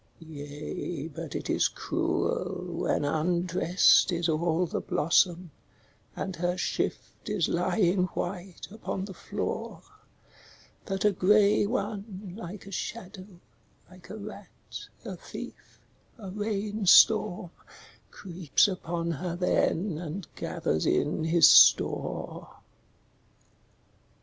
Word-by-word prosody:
Yea, 150 +1 -6
but 145 - -8
it - - -4
is - - +2
cruel - - -2
when - - 0
undressed 175 +5 +3
is 170 -1 0
all 165 +2 +1
the - - -3
blossom, 170 +2 +1 0.6
And 190 -2 -4
her 175 +1 -1
shift - - -3
is 205 -6 +1
lying 180 +1 +1
white 180 0 -5
upon 200 -3 -4
the 195 - -8
floor, - - -5 1.0
That 195 -1 -2
a 210 - +5
grey 205 +2 +4
one, 205 -4 -4
like 200 -2 -8
a 200 - -10
shadow, 185 +1 -6 0.6
like 180 -1 -16
a 215 - -7
rat, 205 -1 -10 0.2
a - - -6
thief, - - -10 0.4
a 200 -5 -8
rain 210 0 -3
storm 180 -3 +5 0.6
Creeps 175 -4 +1
upon 170 -3 -3
her 170 +3 -4
then 180 -1 0
and 175 +2 -6
gathers 80 +1 -2
in 155 +1 +1
his 165 0 +6
store. - - +4
180 Hz, 110 wpm, -28 LUFS, 170-200 Hz, 1.0 s, his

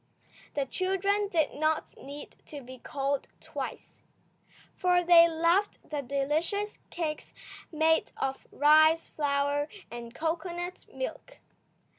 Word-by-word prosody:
The 280 -1 +1
children 385 +6 0
did 325 -6 +1
not 310 +1 0
need 285 +2 -10
to 290 -2 -8
be 255 0 -11
called 275 +2 -2
twice, - - -7 0.7
for 360 -1 +3
they 340 -1 +8
loved 335 +5 +2
the 295 -2 -3
delicious 300 - -1
cakes 310 -3 -4 0.4
made 320 0 +2
of 270 0 -3
rice 310 +2 +5
flour 285 0 0 0.2
and 235 0 -7
cocoanut 345 +2 -3
milk. - - -6
315 Hz, 110 wpm, -29 LUFS, 285-350 Hz, 0.7 s, they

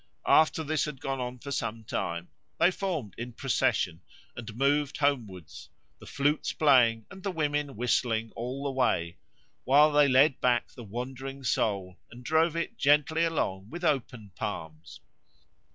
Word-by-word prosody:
After 160 +1 +4
this 155 0 0
had 150 -3 -7
gone 135 0 -3
on 125 0 -4
for 140 +3 -8
some 115 -4 -3
time 85 -5 -4 0.3
they 175 - +5
formed 170 - -3
in 120 +1 -6
procession 115 - 0 0.3
and 115 -3 -8
moved 145 +2 +1
homewards, 110 - -2 0.3
the - - -13
flutes 145 +2 0
playing 120 -7 +4
and 190 -1 -11
the 195 - -2
women 150 -4 -1
whistling 115 -1 0
all 125 +4 -5
the 140 - -1
way, 85 -10 0 0.5
while 145 +3 +5
they 145 -1 +5
led 135 +1 +4
back 120 -1 +2
the 120 - -11
wandering 130 +5 -6
soul 100 -6 -1
and 120 +2 -13
drove 160 +1 +2
it 170 - -4
gently 150 +3 +3
along 105 - -1
with 175 +2 -8
open 125 - -1
palms. 80 +1 -6
130 Hz, 150 wpm, -28 LUFS, 115-150 Hz, 0.5 s, they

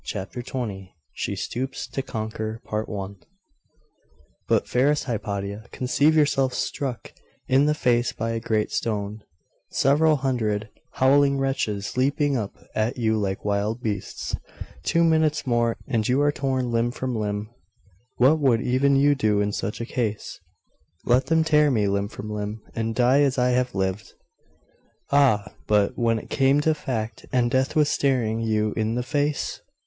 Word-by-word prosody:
CHAPTER 105 +4 -5
XX: 105 -7 -5 0.2
SHE - - -3
STOOPS 130 +3 -4
TO 135 - -4
CONQUER 110 -2 -5 1.8
'But, - - +2
fairest 145 +4 +2
Hypatia, 100 -3 -4
conceive 140 +5 +2
yourself 135 -4 +2
struck 130 -4 -3 0.3
in 135 +3 +4
the 150 - +2
face 120 -4 +2
by 115 +1 -3
a 115 - -2
great 110 -2 -1
stone, 105 -1 -2 0.5
several 155 +3 +3
hundred 110 -6 -1 0.2
howling 140 +1 +4
wretches 130 -7 -2
leaping 140 +2 +2
up 105 -5 -3 0.2
at 110 +4 -1
you 110 -2 +1
like 100 -2 -2
wild 105 +3 -1
beasts 105 -3 -3 0.5
two 170 - +2
minutes 160 -2 +2
more, 120 -2 +1
and 115 -6 0
you 130 +2 +3
are 145 0 +3
torn 130 -3 -1
limb 115 +1 +1
from 125 0 -3
limb. 105 0 -3 0.6
What 140 +6 +4
would 130 -6 +3
even 135 +3 +2
you 145 +1 +5
do 110 -7 +1
in 105 0 +1
such 105 - -3
a - - -2
case?' 115 -4 -3 0.7
'Let 125 +2 +3
them 160 0 +3
tear 150 -2 +4
me 110 -6 +2
limb 100 0 0
from 105 - -8
limb, 105 +1 -4
and 115 0 -2
die 130 +3 +4
as 140 -2 +2
I 125 0 +3
have 125 -1 0
lived.' 95 +1 -2 1.0
'Ah, 135 -8 +3
but 105 +3 +2
When 115 -2 +1
it - - -9
came 135 0 +3
to 155 +1 +2
fact, 120 -7 -4
and 120 -2 +2
death 130 +2 +1
was 150 -1 +4
staring 125 -7 +1
you 110 -2 0
in 110 +1 -1
the 125 - -1
face? 145 +3 -1
120 Hz, 155 wpm, -24 LUFS, 110-135 Hz, 1.8 s, you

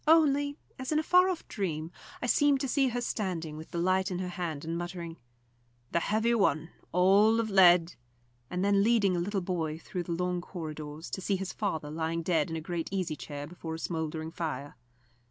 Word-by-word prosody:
Only, 290 -2 +4 0.2
as 260 +2 -4
in 305 - +3
a 310 - +2
far 360 +3 +5
off 360 -3 -4
dream, 165 -6 -3 0.3
I - - +1
seemed 285 +2 +4
to 275 - 0
see 270 +1 +2
her 245 0 -1
standing 175 -9 -2
with 155 +1 -9
the - - -5
light 185 +3 +2
in 180 - -2
her 180 0 -3
hand 165 -4 -4
and 165 +1 -2
muttering, 170 -1 -5 0.7
"The 170 - +2
heavy 220 +6 +1
one 165 -7 +2 0.2
all 200 +5 +5
of 220 -2 -1
lead," 175 -3 +6 0.6
and 180 +2 -1
then 200 0 +4
leading 210 -4 +3
a - - 0
little 195 +3 -1
boy 165 -4 -2
through 180 +2 -5
the 170 0 -3
long 180 +1 -1
corridors 155 -3 -7
to 190 - -3
see 195 +2 +1
his 190 0 -4
father 160 -8 -2
lying 165 +1 -2
dead 165 -3 +1
in 165 - -3
a 160 - -3
great 170 0 -3
easy 185 -5 -1
chair 145 -1 -6
before 160 0 -6
a - - -5
smouldering 160 -1 -3
fire. 145 -4 -4
180 Hz, 205 wpm, -30 LUFS, 160-205 Hz, 0.7 s, lead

